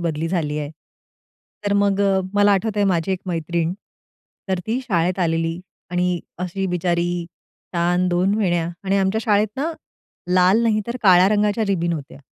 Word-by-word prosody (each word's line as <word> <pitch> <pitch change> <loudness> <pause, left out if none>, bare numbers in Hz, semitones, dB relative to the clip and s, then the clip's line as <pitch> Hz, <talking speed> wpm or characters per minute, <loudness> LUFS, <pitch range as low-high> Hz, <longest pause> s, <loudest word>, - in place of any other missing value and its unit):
बदली 165 -1 -2
झाली 150 -4 -1
आहे. 145 0 -4 0.9
तर 200 - +1
मग 200 -1 +2 0.3
मला 205 0 +5
आठवतंय 205 +1 +1
माझी 185 -1 +1
एक 185 - -3
मैत्रीण. 170 0 -1 0.8
तर 190 - 0
ती 240 +4 -1
शाळेत 180 -5 0
आलेली 165 0 0 0.3
आणि 180 -1 0 0.2
अशी 185 +2 -3
बिचारी 175 -1 -1 0.5
छान 175 +1 +2
2 180 +3 +2
वेण्या 175 -5 +1 0.2
आणि 195 +1 +1
आमच्या 195 +3 +1
शाळेत 210 -1 +3
ना 310 +5 -1 0.6
लाल 185 +5 +4
नाही 215 -2 +2
तर 235 +1 -3
काळ्या 185 -1 +6
रंगाच्या 210 +1 +1
रिबिन 170 -3 0
होत्या. 145 -4 -7
180 Hz, 150 wpm, -21 LUFS, 170-205 Hz, 0.9 s, काळ्या